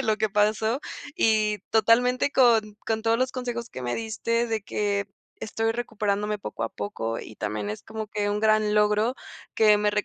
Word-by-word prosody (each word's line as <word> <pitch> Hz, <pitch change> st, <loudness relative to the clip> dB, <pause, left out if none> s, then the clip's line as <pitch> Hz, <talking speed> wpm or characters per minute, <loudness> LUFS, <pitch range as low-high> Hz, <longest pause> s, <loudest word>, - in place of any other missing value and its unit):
de -, -, 0 dB
lo 220 Hz, -2 st, +2 dB
que 215 Hz, 0 st, 0 dB
pasó. 215 Hz, +4 st, +2 dB, 0.4 s
Y 215 Hz, -1 st, +2 dB
totalmente 245 Hz, +5 st, +3 dB
con 225 Hz, -6 st, +3 dB
con 220 Hz, -1 st, -1 dB
todos 225 Hz, 0 st, +2 dB
los 255 Hz, 0 st, 0 dB
consejos 240 Hz, -2 st, -4 dB
que 130 Hz, -, -8 dB
me 120 Hz, 0 st, -2 dB
diste 230 Hz, +1 st, -1 dB
de 220 Hz, -2 st, -2 dB
que 200 Hz, -1 st, -1 dB, 0.3 s
estoy 225 Hz, +1 st, -1 dB
recuperándome 210 Hz, -3 st, -2 dB
poco -, -, -6 dB
a -, -, 0 dB
poco, 115 Hz, -, -4 dB
y 110 Hz, -, -9 dB
también 105 Hz, -1 st, -3 dB
es 105 Hz, -, -5 dB
como 220 Hz, 0 st, -6 dB
que 205 Hz, 0 st, -2 dB
un 205 Hz, -, 0 dB
gran 215 Hz, -1 st, +3 dB
logro 210 Hz, +3 st, +2 dB, 0.4 s
que 215 Hz, -1 st, +5 dB
me 210 Hz, 0 st, +2 dB
215 Hz, 185 wpm, -26 LUFS, 210-230 Hz, 0.4 s, que